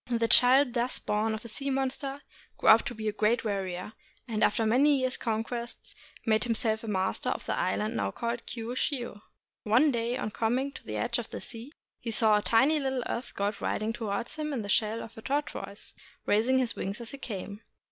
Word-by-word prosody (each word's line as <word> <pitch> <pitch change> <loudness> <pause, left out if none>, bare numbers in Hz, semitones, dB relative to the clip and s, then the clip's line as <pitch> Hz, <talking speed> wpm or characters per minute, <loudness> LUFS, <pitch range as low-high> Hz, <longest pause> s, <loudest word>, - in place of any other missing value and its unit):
The 230 -1 +1
child 250 +2 +6
thus 245 +1 0
born 215 +1 0
of 220 - -9
a - - -5
sea 275 +5 -4
monster 270 +1 -2 0.3
grew - - +3
up 220 +1 +9
to 245 - -4
be 220 0 -4
a - - +2
great 220 +3 +1
warrior, 190 -1 -3 0.3
and 220 -2 0
after 225 +2 +3
many 275 +6 +4
years' 255 0 +2
conquest 235 +1 -4 0.3
made 220 -2 +3
himself 225 -2 +1
master 190 -2 0
of - - -3
the - - -1
island 215 +2 -1
now - - 0
called 235 0 -4
Kiushiu. 240 -1 -3 0.4
One 245 +8 +4
day, 235 0 -1
on 215 - -3
coming 245 +6 0
to - - -11
the - - -4
edge - - 0
of - - -6
the - - -6
sea, 235 +4 -7 0.3
he 235 - -5
saw 215 -1 +4
a - - -4
tiny 270 +9 +4
little 265 -3 -1
earth 240 +1 -4
god 205 +1 -2
riding 215 +1 -1
towards 225 +2 -3
him 305 -1 -2
in 240 -5 -2
the 200 - -6
shell 220 +2 +1
of 225 - -11
a - - -9
tortoise, 245 -7 -4 0.3
raising 230 +5 +3
his 250 -3 +1
wings 195 +3 -3
as 235 -1 -6
he 275 - -8
came. 205 -3 -6
230 Hz, 205 wpm, -29 LUFS, 215-255 Hz, 0.4 s, up